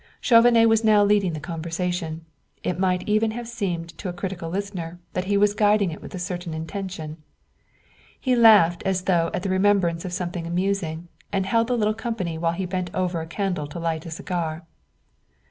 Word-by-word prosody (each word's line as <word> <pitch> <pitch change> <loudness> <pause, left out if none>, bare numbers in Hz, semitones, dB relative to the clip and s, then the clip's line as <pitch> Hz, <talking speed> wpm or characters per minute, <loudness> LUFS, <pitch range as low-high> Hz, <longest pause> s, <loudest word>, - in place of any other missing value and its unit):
Chauvenet 230 -1 +6
was 225 0 +3
now 215 -2 +5
leading 200 -4 +2
the 155 - -4
conversation; 165 +1 -3 0.4
it 180 - -2
might 180 -1 0
even 215 +1 +2
have 235 +2 -5
seemed 175 -8 -4
to 190 - -4
a - - -4
critical 175 -2 -5
listener 180 -3 -4
that 180 - -2
he 200 +1 +1
was 205 0 +4
guiding 205 -3 +3
it 160 - -8
with - - -9
a - - -4
certain 175 -2 -4
intention. 160 -2 -5 1.0
He 255 -2 +1
laughed 210 -8 +6
as 190 -2 0
though 175 -3 +2
at 180 - -3
the 195 - -1
remembrance 185 -3 +2
of 185 - -5
something 175 -1 -3
amusing, 175 -2 -1 0.2
and 195 -2 0
held 230 +3 +2
the 245 -1 0
little 215 -1 +2
company 220 -8 -3
while 165 0 +1
he 190 +2 -3
bent 180 0 -3
over 180 -2 -1
a 160 - -7
candle 175 -2 -2
to 145 - -8
light 165 -1 -2
a - - -5
cigar. 165 -1 -3
185 Hz, 190 wpm, -24 LUFS, 170-205 Hz, 1.0 s, Chauvenet